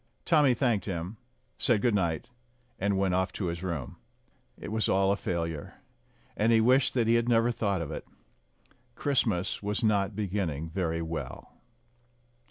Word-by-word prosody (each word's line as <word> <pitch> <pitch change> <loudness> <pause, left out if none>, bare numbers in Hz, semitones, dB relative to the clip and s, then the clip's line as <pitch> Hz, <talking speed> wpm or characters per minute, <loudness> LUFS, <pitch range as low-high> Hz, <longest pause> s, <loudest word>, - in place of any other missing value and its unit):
Tommy 150 -6 +4
thanked 115 -4 +1
him, 90 +2 -4 0.4
said 115 -4 +3
good 120 - +3
night, 85 -6 0 0.5
and 100 0 +1
went 95 -1 +1
off 95 +1 +1
to 100 - -3
his 85 0 -3
room. 85 -9 -4 0.6
It - - -7
was 110 -2 0
all 95 0 +3
a - - +3
failure, 85 -5 -3 0.6
and 110 +2 +2
he 115 - +5
wished 130 +5 +3
that 120 -3 +3
he 115 - +3
had 115 +1 +2
never 115 0 +4
thought 100 -6 -1
of 75 - -6
it. - - -6 0.9
Christmas 115 -10 0
was 105 +2 -1
not 100 -2 +2
beginning 90 -7 -2
very 85 -2 -1
well. 80 0 -6
100 Hz, 160 wpm, -29 LUFS, 85-115 Hz, 0.9 s, he